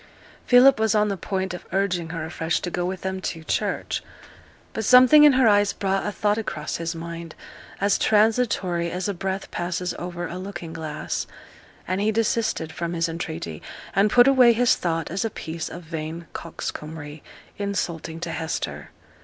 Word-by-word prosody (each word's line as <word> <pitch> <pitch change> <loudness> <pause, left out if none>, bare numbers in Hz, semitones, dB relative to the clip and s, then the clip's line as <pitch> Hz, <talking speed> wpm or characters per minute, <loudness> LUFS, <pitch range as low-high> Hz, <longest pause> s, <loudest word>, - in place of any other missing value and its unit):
Philip 250 0 +7
was 220 0 +2
on 210 0 +3
the 200 - -1
point 190 0 -3
of 180 - -7
urging 180 -4 0
her 165 -1 -4
afresh 160 +1 -1
to 175 - -4
go 175 +1 -1
with 185 0 -4
them 190 0 -3
to 165 -3 -4
church; - - -1 0.7
but 220 - -3
something 255 +6 +8
in 295 - +7
her 255 -2 +4
eyes 205 -1 +4
brought 195 0 -1
a - - -1
thought 210 +2 0
across 155 -8 -4
his 165 0 -3
mind, 165 0 -7 0.4
as 200 +1 +2
transitory 210 -6 +2
as 180 +2 -3
a 200 - -1
breath 190 +1 -4
passes 175 0 -2
over 175 0 -4
a 180 - -6
looking 175 -4 -7
glass, 155 -2 -4 0.6
and 185 +2 -1
he 215 +1 +2
desisted 220 -7 0
from 170 +1 -4
his 170 0 0
entreaty, 160 - -5 0.3
and 200 +2 +4
put 245 +3 +6
away 255 -3 +6
his 240 +1 +4
thought 165 -2 -2
as 190 +5 -1
a 225 - 0
piece 160 -4 -5
of 175 - -8
vain 160 +1 -5
coxcombry, 155 -2 -6 0.4
insulting 170 -5 -3
to 170 -1 -3
Hester. 160 0 -4
180 Hz, 175 wpm, -24 LUFS, 165-210 Hz, 0.7 s, something